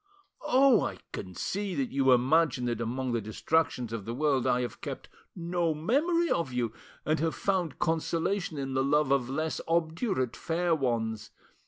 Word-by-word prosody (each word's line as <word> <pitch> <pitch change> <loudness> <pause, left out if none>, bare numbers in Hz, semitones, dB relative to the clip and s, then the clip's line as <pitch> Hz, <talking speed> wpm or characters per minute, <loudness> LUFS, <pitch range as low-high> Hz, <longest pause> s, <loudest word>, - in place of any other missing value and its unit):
"Oh! 260 -2 +5
I - - -3 0.2
can 95 -2 -6
see 195 - -2
that 135 -4 -1
you 135 -1 +3
imagine 130 +1 +3
that 120 -1 -2
among 125 +2 -2
the 115 -1 0
distractions 115 +3 0
of 115 -3 -4
the 115 - -4
world 140 -2 +1
I 125 - +2
have 120 - -5
kept - - -6 0.3
no 170 -2 -1
memory 310 - +1
of 165 -6 0
you, 120 -3 -1 0.3
and 155 +1 +1
have 165 0 0
found 185 -6 -1
consolation 165 +2 -1
in 135 -1 -3
the 130 0 +2
love 145 0 +2
of 130 -3 +2
less 155 +4 -2
obdurate 165 - 0
fair 170 +1 0
ones. 115 -7 -1
150 Hz, 170 wpm, -29 LUFS, 125-170 Hz, 0.3 s, Oh